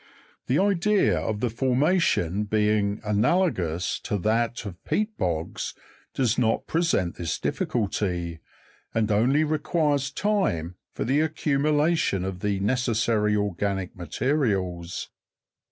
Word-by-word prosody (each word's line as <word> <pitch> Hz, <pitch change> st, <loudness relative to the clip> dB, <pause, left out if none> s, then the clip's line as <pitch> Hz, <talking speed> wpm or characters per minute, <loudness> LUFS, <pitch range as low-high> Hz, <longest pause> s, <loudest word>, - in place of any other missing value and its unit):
The 130 Hz, -, +2 dB
idea 200 Hz, -, +3 dB
of 105 Hz, +6 st, -3 dB
the 125 Hz, -, +1 dB
formation 125 Hz, -, +1 dB
being 105 Hz, -1 st, +1 dB
analogous 105 Hz, -, +1 dB
to 105 Hz, -, -2 dB
that 115 Hz, +4 st, 0 dB
of 95 Hz, -3 st, -8 dB
peat 215 Hz, +1 st, -1 dB
bogs 85 Hz, -3 st, -3 dB, 0.4 s
does 125 Hz, -3 st, +1 dB
not 115 Hz, -2 st, +1 dB
present 165 Hz, -, 0 dB
this 85 Hz, -3 st, -2 dB
difficulty, 90 Hz, -7 st, -2 dB, 0.6 s
arid 110 Hz, -1 st, +1 dB
only 125 Hz, +9 st, +3 dB
requires 150 Hz, -2 st, 0 dB
lime 140 Hz, -, +1 dB, 0.2 s
for -, -, -3 dB
the 135 Hz, +5 st, +2 dB
accumulation 150 Hz, -, +1 dB
of 95 Hz, -1 st, -4 dB
the 100 Hz, 0 st, -1 dB
necessary 110 Hz, -2 st, +1 dB
organic 100 Hz, -2 st, -2 dB
materials. 90 Hz, -, -1 dB
110 Hz, 110 wpm, -25 LUFS, 95-145 Hz, 0.6 s, idea